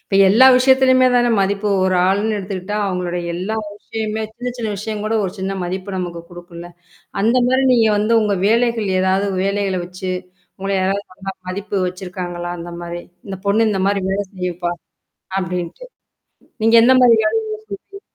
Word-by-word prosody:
இப்ப - - -6
எல்லா 230 +7 +7
விஷயத்துலயுமே 260 0 +5
தான 240 0 +4
மதிப்பு 200 +2 0 0.2
ஒரு 185 0 +2
ஆள்ன்னு 210 +3 +1
எடுத்துக்கிட்டா, 195 +1 -4
அவங்களுடைய 180 -2 -2
எல்லா 185 +5 -3 0.2
விஷயமே 220 +1 -4
சின்ன 245 +2 -5
சின்ன 230 -3 -3
விஷயம் 210 +1 -4
கூட 215 +1 -1
ஒரு 185 - -3
சின்ன 190 +1 -2
மதிப்பு 190 +2 -4
நமக்கு 175 -2 -4
குடுக்கும்ல. 175 0 -10 0.5
அந்த 230 +5 +3
மாரி 260 +1 +2
நீங்க 230 -3 +4
வந்து, 215 +3 +1
உங்க 210 -2 +1
வேலைகள் 230 -1 +2
எதாவது 190 +2 +1 0.2
வேலைகள 195 -1 0
வச்சி 185 +1 -6 0.5
உங்கள 195 +1 -3
யாராவது 195 +2 -1
ஒண்ணா 195 +1 -6 0.2
மதிப்பு 200 +2 -4
வச்சிருக்காங்களா, 180 -1 -5
அந்த 170 +1 -7
மாரி, 175 0 -6 0.3
இந்த 195 -1 -5
பொண்ணு, 220 +3 +3
இந்த 195 - -1
மாரி 200 -1 +1
வேலை 200 +1 -1
செய்யும்ப்பா, 180 -2 -3 0.7
அப்படின்ட்டு. 180 - -4 0.8
நீங்க 225 +1 +5
எந்த 260 +2 +6
மாரி 240 -2 +7
வேலைய 220 +1 +1 0.4
செய்வீங்க? 395 0 -13
200 Hz, 160 wpm, -19 LUFS, 185-220 Hz, 0.8 s, எல்லா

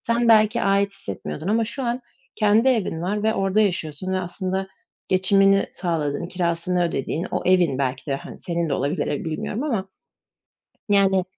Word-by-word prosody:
sen 235 0 0
belki 220 +1 +4
ait 200 0 +2
hissetmiyordun 160 - -6
ama 225 +2 +2
şu 265 +5 -2
an 240 +1 -2 0.3
kendi 215 +3 +3
evin 205 -10 0
var 205 +4 -2
ve 220 0 +1
orada 195 +2 +1
yaşıyorsun 185 -2 -1
ve 185 - +1
aslında 185 +2 -2 0.4
geçimini 195 +1 +4
sağladığın, 165 -3 -2
kirasını 175 0 0
ödediğin 165 +2 -2
o - - -2
evin, 175 -7 +3
belki 135 +1 -2
de, 135 - +1
hani, - - -10
senin 170 -1 -2
de 140 - 0
olabilir 140 +2 -1
belki 145 - -2
ev - - -8
bilmiyorum 185 - -3
ama, 220 -10 -2 1.0
yani, 195 -2 +4
190 Hz, 170 wpm, -23 LUFS, 170-210 Hz, 1.0 s, belki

